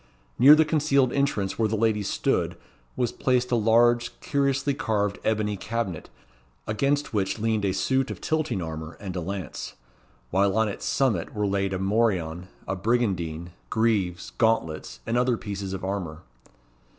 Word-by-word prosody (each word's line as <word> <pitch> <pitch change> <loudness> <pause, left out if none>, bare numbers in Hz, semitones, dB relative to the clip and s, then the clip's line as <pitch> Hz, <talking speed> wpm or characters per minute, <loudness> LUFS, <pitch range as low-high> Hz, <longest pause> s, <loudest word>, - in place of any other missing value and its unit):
Near 140 +5 +9
the 160 0 +4
concealed 145 -4 +2
entrance 115 -9 0
where 110 - +3
the 110 - 0
lady 110 -1 +1
stood 100 - 0 0.4
was 120 -2 0
placed 125 -1 0
a - - +4
large 120 +1 +3
curiously 140 0 0
carved 105 -6 -1
ebony 105 -1 0
cabinet, 100 -4 -4 0.6
against 140 +6 0
which 95 -1 0
leaned 110 -1 0
a 95 - +2
suit 130 +8 0
of - - -6
tilting 155 - -1
armour 80 0 -6
and 95 -3 -6
a 90 - -2
lance; 95 +2 -5 0.6
while 95 +2 +2
on 110 0 +3
its 100 - -5
summit 110 -12 0
were 105 -1 0
laid 100 -1 0
a 95 - -1
morion, 95 -4 0 0.2
a 95 - -1
brigandine, 90 -6 -1 0.2
greaves, 105 -6 0
gauntlets, 110 -9 0
and 115 +2 +1
other 125 -1 +2
pieces 100 -4 -5
of 95 -1 -5
armour. 90 -5 -4
110 Hz, 155 wpm, -26 LUFS, 95-120 Hz, 0.6 s, Near